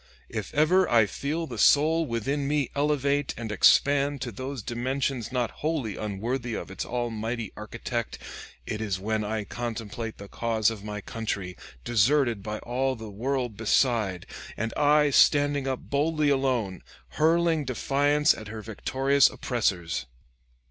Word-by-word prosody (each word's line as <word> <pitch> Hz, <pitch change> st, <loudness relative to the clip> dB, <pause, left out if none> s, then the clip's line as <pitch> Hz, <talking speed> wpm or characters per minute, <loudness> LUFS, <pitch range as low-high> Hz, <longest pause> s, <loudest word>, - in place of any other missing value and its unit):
If -, -, -5 dB
ever 180 Hz, +5 st, +4 dB
I 115 Hz, -2 st, +5 dB
feel 150 Hz, -, -3 dB
the 120 Hz, -8 st, -7 dB
soul 155 Hz, +6 st, +4 dB
within 135 Hz, +5 st, -1 dB
me 145 Hz, -2 st, 0 dB
elevate 145 Hz, -1 st, +1 dB
and 115 Hz, -2 st, -5 dB
expand 140 Hz, +5 st, +4 dB
to 125 Hz, -2 st, -3 dB
those 130 Hz, +2 st, -6 dB
dimensions 130 Hz, +1 st, -2 dB
not 125 Hz, -3 st, -1 dB
wholly 150 Hz, -9 st, -1 dB
unworthy 115 Hz, +4 st, -3 dB
of -, -, -6 dB
its -, -, -4 dB
almighty 115 Hz, -2 st, -3 dB
architect, 115 Hz, +2 st, -4 dB, 0.5 s
it 105 Hz, -, -4 dB
is 100 Hz, -4 st, -2 dB
when 110 Hz, +2 st, -1 dB
I 110 Hz, 0 st, -2 dB
contemplate 115 Hz, 0 st, -5 dB
the 100 Hz, -, -9 dB
cause 115 Hz, 0 st, 0 dB
of 105 Hz, -3 st, -8 dB
my 105 Hz, 0 st, -5 dB
country, 100 Hz, -5 st, -4 dB, 0.3 s
deserted 120 Hz, -, +2 dB
by 105 Hz, +2 st, -4 dB
all 130 Hz, +2 st, -1 dB
the 110 Hz, -2 st, -8 dB
world 125 Hz, +2 st, -2 dB
beside, 110 Hz, -5 st, +1 dB, 0.3 s
and 115 Hz, +2 st, -2 dB
I 150 Hz, 0 st, +4 dB
standing 145 Hz, 0 st, +4 dB
up 130 Hz, -1 st, -2 dB
boldly 150 Hz, +1 st, +2 dB
alone, 125 Hz, -9 st, 0 dB, 0.3 s
hurling 165 Hz, 0 st, +2 dB
defiance 145 Hz, +4 st, +2 dB
at 110 Hz, -, -9 dB
her 110 Hz, 0 st, -7 dB
victorious 135 Hz, +6 st, +2 dB
oppressors. 90 Hz, -, -1 dB
120 Hz, 140 wpm, -27 LUFS, 110-140 Hz, 0.5 s, I